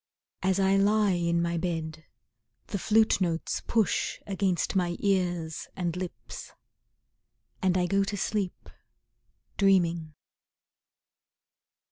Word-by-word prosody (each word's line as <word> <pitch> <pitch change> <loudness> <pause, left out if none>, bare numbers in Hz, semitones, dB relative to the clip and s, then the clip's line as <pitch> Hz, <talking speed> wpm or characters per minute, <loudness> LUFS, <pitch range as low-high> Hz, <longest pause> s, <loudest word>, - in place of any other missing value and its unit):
As 190 0 +1
I 195 0 +4
lie 205 +1 +3
in 170 -1 +1
my 170 0 -1
bed 160 -2 -3 0.6
The 200 - -4
flute 220 0 +3
notes 165 -2 -1
push 220 -4 +1
against 190 -3 0
my 175 -2 +1
ears 175 -5 -1
and 175 -3 -2
lips, 180 -1 -7 1.1
And 185 -1 +2
I 180 - +2
go 195 +2 +2
to 205 +1 -3
sleep, 200 -2 -2 0.9
dreaming. 170 -5 +2
185 Hz, 105 wpm, -28 LUFS, 170-195 Hz, 1.1 s, I